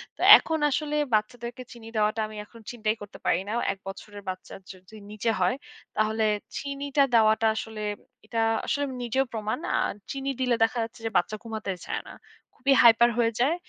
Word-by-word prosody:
তো - - -11 0.2
এখন 320 -1 -2
আসলে 300 +1 -1 0.2
বাচ্চাদেরকে 235 +3 -1
চিনি 230 -2 -12
দেওয়াটা 215 +1 +1
আমি 215 - -11
এখন 230 +2 -16
চিন্তাই 220 -2 -1
করতে 205 0 -10
পারি 170 - +3
না। - - -2 0.2
১ 195 - -17
বছরের 205 +1 -8
বাচ্চা 185 0 -7 0.2
যদি 185 +2 -15 0.2
নিচে 215 +2 -2
হয় 250 - +2 0.4
তাহলে 220 +1 +1 0.3
চিনিটা 280 +1 0
দেওয়াটা 220 -1 +4
আসলে 220 -1 -5 0.4
এটা 230 - -3 0.3
আসলে 285 - 0 0.2
নিজেও 245 +3 0
প্রমাণ। 215 -1 -2 0.2
আর - - 0 0.2
চিনি 275 0 -3
দিলে 250 -2 +2
দেখা 225 +2 +1
যাচ্ছে 225 0 -8
যে - - 0
বাচ্চা 215 - 0
ঘুমাতে 220 -3 -4
চায় - - -3
না। - - -9 0.4
খুবই 275 +1 +2
হাইপার 235 0 +7
হয়ে 230 -1 +3
যায়। 275 +7 +3
225 Hz, 175 wpm, -26 LUFS, 215-255 Hz, 0.4 s, হাইপার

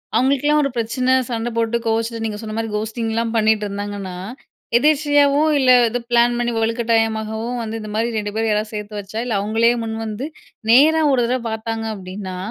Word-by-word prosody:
அவங்களுக்கெல்லா 280 +3 +3
ஒரு 275 - 0
பிரச்சனை, 250 +3 0 0.2
சண்டை 235 0 -2
போட்டு 230 0 +1
கோவச்சிட்டு 225 0 -1
நீங்க 210 -1 -3
சொன்ன 215 -1 -6
மாதிரி 225 -1 -2
கஹோஸ்டிங்ல 220 +1 -2 0.2
பண்ணிட்டு 215 -1 +2
இருந்தாங்கன்னா. 200 -2 -5 0.6
எதேர்ச்சையாவு 290 0 +3 0.2
இல்ல 260 -2 +4 0.2
எதோ 245 +2 -2
பிளான் 240 0 +4
பண்ணி 240 0 0
வலுக்கட்டாயமாகவும் 225 0 0
வந்து 225 0 -4
இந்த 215 - -7
மாதிரி 230 +1 -1
2 205 -1 -3
பேர் 225 0 0
யாராவது 210 +1 0
சேர்த்து 210 0 -6
வச்சா 205 +3 -6
இல்ல 240 - -2
அவங்களே 225 +3 +2
முன் 220 0 -4
வந்து, 220 +5 -4 0.4
நேரா 305 +7 +6
ஒரு 255 -2 +3
தடவை 250 +2 0
பார்த்தாங்க 225 0 -4
அப்படின்னா, 185 0 -7
225 Hz, 170 wpm, -20 LUFS, 215-240 Hz, 0.6 s, நேரா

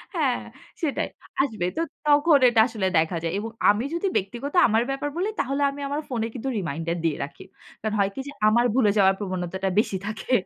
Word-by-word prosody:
হ্যাঁ, - - +1 0.4
সেটাই, 305 -5 -1 0.3
আসবে। 220 -10 -1
তো - - +1 0.3
তখন 295 +1 +5
এটা 230 - +2
আসলে 215 -6 -2
দেখা 160 +2 +2
যায় 165 - -1
এবং 225 +2 -4 0.2
আমি 210 +4 +3
যদি 340 +4 0
ব্যক্তিগত 240 +9 -4
আমার 225 +1 +2
ব্যাপার 275 +2 -2
বলি, 375 +4 0
তাহলে 275 +2 -2
আমি 285 - -8
আমার 290 +2 -2
ফোনে 230 -4 -1
কিন্তু 265 +2 -4
রিমাইন্ডার 170 0 -3
দিয়ে 155 - +1
রাখি। 140 - -9 0.4
কারণ 220 0 -2
হয় 195 - +3
কি - - -6
যে, - - -6 0.2
আমার 235 +3 +4
ভুলে 215 -6 +4
যাওয়ার 195 -1 +5
প্রবণতাটা 185 -1 -3
বেশি 200 -3 0
থাকে। 215 +4 -5
220 Hz, 195 wpm, -25 LUFS, 190-275 Hz, 0.4 s, তখন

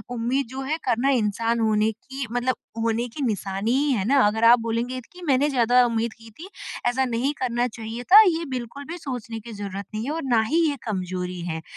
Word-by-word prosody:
उम्मीद 245 +3 0
जो 265 +1 -6
है 295 +4 -2
करना 245 +2 +2
इंसान 230 -1 +1
होने 220 0 +2
की 265 +4 -7
मतलब 245 +1 0 0.3
होने 230 +2 0
की 290 +5 -8
निशानी 205 0 -1 0.2
है 195 -5 -1
ना? 275 +4 +4
अगर 220 +2 -1
आप 235 +1 +7
बोलेंगे 230 +3 -2
की 360 0 -13
मैंने 280 +1 +3
ज़्यादा 245 -1 +4
उम्मीद 230 -1 -1
की 225 -1 -15
थी 370 +4 -9 0.4
ऐसा 260 +2 +2
नहीं 250 +4 -1
करना 245 -1 0
चाहिए 225 0 -7
था 425 +2 +11
ये 335 -1 0
बिल्कुल 250 +3 -6
भी 345 - -5
सोचने 245 -7 -6
की 230 +2 -10
ज़रूरत 200 -1 -6
नहीं 215 +2 -3
है 285 - -2
और 325 -1 -3
ना 240 -4 +3
ही 320 +9 +1
ये - - -1
कमजोरी 185 -3 -3
है। 160 -2 -4
235 Hz, 210 wpm, -24 LUFS, 220-265 Hz, 0.4 s, था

